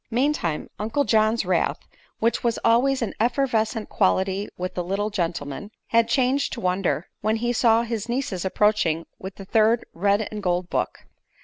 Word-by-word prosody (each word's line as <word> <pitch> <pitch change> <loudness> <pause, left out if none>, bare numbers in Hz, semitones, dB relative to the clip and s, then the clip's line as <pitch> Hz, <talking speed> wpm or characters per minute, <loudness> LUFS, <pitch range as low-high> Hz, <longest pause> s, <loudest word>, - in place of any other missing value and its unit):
Meantime 240 - 0
Uncle 225 +7 0
John's 220 -2 +2
wrath, 180 -2 +1 0.4
which 230 +1 0
was 235 -2 +1
always 250 +3 +3
an 230 - -3
effervescent 230 -2 0
quality 190 0 +1
with 180 0 -4
the 180 - -2
little 200 +4 -2
gentleman, 170 -2 -3 0.2
had 230 0 +3
changed 265 +2 +1
to - - -5
wonder 180 -4 0
when 215 +1 +1
he 240 +2 -1
saw 230 -1 +4
his 230 -1 -4
nieces 240 -8 -2
approaching 190 -5 +1
with 190 0 -7
the 195 - -10
third 220 +3 +3
red 200 +4 +1
and 210 -1 -5
gold 180 -1 -1
book. - - -2
215 Hz, 165 wpm, -24 LUFS, 190-235 Hz, 0.4 s, saw